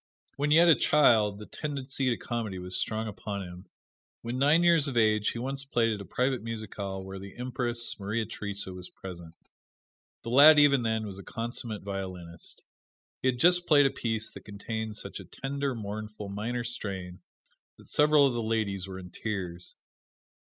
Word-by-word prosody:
When 145 +1 0
yet 165 +3 +6
a 165 - +9
child 110 -9 +4
the 105 - -9
tendency 135 -2 -3
to 120 - 0
comedy 115 -5 -4
was 90 0 -4
strong 110 0 -1
upon 100 -1 -5
him. 90 +1 -10 0.6
When 120 +2 -3
nine 150 +5 +4
years 165 -4 +4
of 130 -3 -3
age 110 -2 +3
he - - -5
once 135 +3 -4
played 115 -4 +1
at 105 - -5
a - - -8
private 130 +3 0
musicale 105 -4 -5
where 95 0 -7
the 100 +2 -10
Empress, 120 -2 -1
Maria 110 +3 -1
Theresa, 100 -3 -3
was 90 0 -9
present. 85 -3 -10 0.9
The 115 - -5
lad 150 +4 +9
even 140 -3 +6
then 110 -1 0
was 100 -2 -7
a - - -9
consummate 115 -2 -5
violinist. 95 -4 -6 0.6
He - - +1
had 130 -1 +2
just 175 +5 +4
played 145 -2 +6
a 135 - +3
piece 115 -1 -2
that - - -10
contained 110 +1 -5
such - - -5
a - - -8
tender, 140 -1 -3
mournful, 105 -1 -6
minor 115 +5 -3
strain 95 -6 -5 0.6
that - - -17
several 150 -1 +5
of 135 - +2
the 120 - -1
ladies 110 -4 -1
were 95 -1 -7
in 90 -1 -10
tears. 90 -5 -4
110 Hz, 180 wpm, -29 LUFS, 100-130 Hz, 0.9 s, a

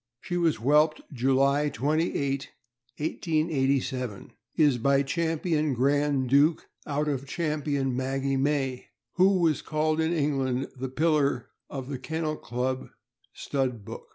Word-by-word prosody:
She 175 - -5
was 170 -3 +2
whelped 150 +5 +3
July 135 +3 +2
28, 140 0 -1 0.5
1887, 140 - -1 0.2
is 145 -6 +3
by 140 +3 +3
Champion 160 -1 0
Grand 140 +1 +2
Duke, 145 +5 +3 0.2
out 150 +1 -1
of 140 -2 -2
Champion 145 -4 -1
Maggie 135 +1 -1
May, 135 -2 0 0.3
who 190 +1 +5
was 165 -4 +2
called 155 +1 0
in 160 +1 +1
England 135 -5 0
the 130 0 -4
pillar 150 0 +1 0.2
of 135 -2 -6
the 135 -2 -5
Kennel 160 +2 -2
Club 130 +2 -3 0.5
Stud 125 -6 -2
Book. - - -8
140 Hz, 125 wpm, -27 LUFS, 130-155 Hz, 0.5 s, who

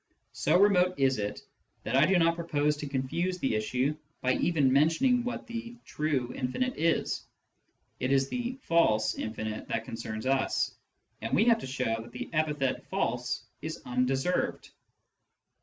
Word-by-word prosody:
So 180 - +3
remote 185 -2 +4
is 135 -3 +2
it 105 0 -3 0.4
that 115 - -1
I 140 +3 +6
do 190 0 +4
not 165 -1 +4
propose 150 -3 0
to 145 - -5
confuse 155 +7 -1
the 135 -9 0
issue 125 +7 0 0.3
by 130 0 +2
even 145 -6 +2
mentioning 165 - +3
what 245 - -4
the 235 +1 -6
"true" 140 -5 -1
infinite 255 - -1
is. 165 +1 +1 0.8
It 130 - 0
is 135 -1 +3
the 245 - -3
"false" 110 -11 +3
infinite 110 0 -4
that 115 0 -2
concerns 115 -1 -5
us, 135 0 +1 0.5
and 115 - -1
we 215 - +4
have 230 -1 +5
to - - -6
show 125 -4 -1
that 115 - -12
the - - -6
epithet 150 -4 0
" - - -34
false - - -1
" - - -45
is - - -5
undeserved. 130 +7 0
140 Hz, 160 wpm, -29 LUFS, 125-175 Hz, 0.8 s, I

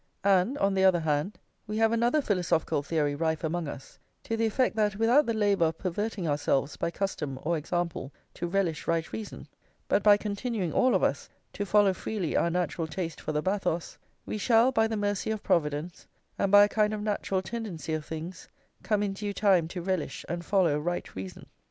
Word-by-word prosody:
And, 200 +6 +3
on 195 0 +2
the 190 0 +2
other 185 -3 +5
hand, 155 +5 -1 0.3
we 210 +1 -3
have 225 0 +3
another 240 +6 +2
philosophical 175 - 0
theory 150 -1 0
rife 160 +2 -1
among 165 0 -2
us, 140 -1 -9 0.2
to 225 - -2
the 225 0 +1
effect 250 +2 +1
that 210 -2 +1
without 235 +7 +4
the 230 - +1
labour 205 -5 +3
of 160 0 -1
perverting 195 +1 -3
ourselves 145 -1 0
by - - -1
custom 165 -7 -3
or 170 +2 +1
example 165 -3 -3 0.2
to 175 - -4
relish 175 -4 -1
right 165 -1 -1
reason, 220 -2 -7 0.4
but - - +2
by 205 0 +6
continuing 205 - -3
all 255 0 +3
of - - +1
us - - 0 0.2
to 205 - -3
follow 205 -1 +4
freely 190 -3 -3
our 170 - +2
natural 170 -1 -1
taste 165 0 -5
for - - -3
the 150 0 -1
bathos, 180 -4 -2 0.3
we 215 - -4
shall, 235 +3 +4
by 225 -3 +3
the 220 -1 -2
mercy 205 0 -1
of 220 -1 -3
Providence, 150 +1 -1 0.3
and 195 - 0
by 205 0 +9
a - - +5
kind 215 0 +1
of 210 - -5
natural 200 -2 -1
tendency 195 -8 -5
of 155 -1 -2
things, 165 +3 -7 0.3
come 210 -1 0
in 200 -1 -1
due 205 +1 -4
time 190 -5 +3
to 175 +1 -6
relish 185 -3 -2
and 170 +1 -4
follow 170 -6 +2
right 175 +3 -3
reason. 95 0 -7
190 Hz, 200 wpm, -28 LUFS, 165-210 Hz, 0.4 s, by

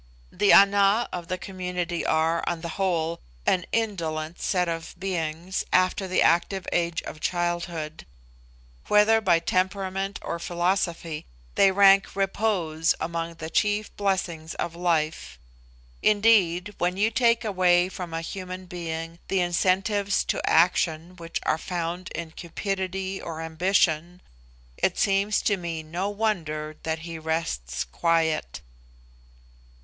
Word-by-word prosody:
The 205 - +3
Ana 200 +3 +6
of 175 -2 -5
the 185 0 -2
community 180 -2 -4
are, 160 +1 +1
on 170 -1 -3
the 170 - -5
whole, 170 -2 -1 0.3
an 180 -2 +1
indolent 170 -8 -2
set 180 -2 +1
of 165 -1 -4
beings 175 -1 -2
after 185 +1 +2
the 185 - +2
active 175 +3 +2
age 170 -1 0
of 155 - -8
childhood. 175 - -2 0.8
Whether 210 +2 +5
by 180 -5 +4
temperament 190 +2 -1
or 170 - -3
philosophy, 170 -2 -1 0.3
they 195 - +5
rank 195 0 +5
repose 190 -5 0
among 165 0 -3
the 160 0 -7
chief 210 +2 0
blessings 180 -5 -2
of 170 - -3
life. 165 -3 -1 0.6
Indeed, 205 -3 +3
when 180 +1 0
you 215 +3 +2
take 230 0 +2
away 180 -3 +3
from 180 -2 -7
a 165 0 -3
human 185 +1 -6
being 165 -2 -5
the 190 -1 +1
incentives 195 +3 +1
to - - -1
action 170 0 +2
which 165 -1 -4
are 160 - +1
found 175 +1 -4
in 170 -1 -5
cupidity 190 +2 -4
or 165 -1 -6
ambition, 170 0 0 0.5
it - - +1
seems 200 +1 +2
to 205 - +2
me 170 -3 -4
no 175 +6 -3
wonder 160 -8 -2
that 160 0 -3
he 165 -1 -6
rests 160 - -2
quiet. 160 - 0
175 Hz, 130 wpm, -26 LUFS, 165-195 Hz, 0.8 s, Ana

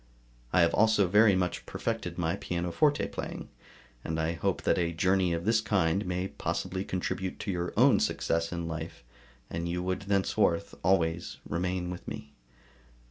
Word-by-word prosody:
I 90 - +4
have 85 0 +4
also 110 -2 +4
very 105 +2 +5
much 90 -1 -1
perfected - - -3
my - - 0
pianoforte 90 - 0
playing, - - -6 0.5
and 80 0 -2
I 80 +1 +1
hope 85 - -1
that - - +2
a 85 -1 +1
journey 90 +2 +2
of 85 +1 -2
this 110 0 +3
kind 95 -3 +1
may 90 +1 -2
possibly 95 0 -3
contribute 95 0 -3
to 100 - -2
your 90 -1 -2
own - - +6
success 85 0 0
in 85 -1 -3
life, 80 -5 -6 0.4
and 85 +1 -3
you 90 +1 -2
would 95 +1 -1
thenceforth 100 -1 +1
always 85 -3 +1
remain 90 0 -2
with 90 - -8
me. 70 0 -7
90 Hz, 160 wpm, -29 LUFS, 85-95 Hz, 0.5 s, own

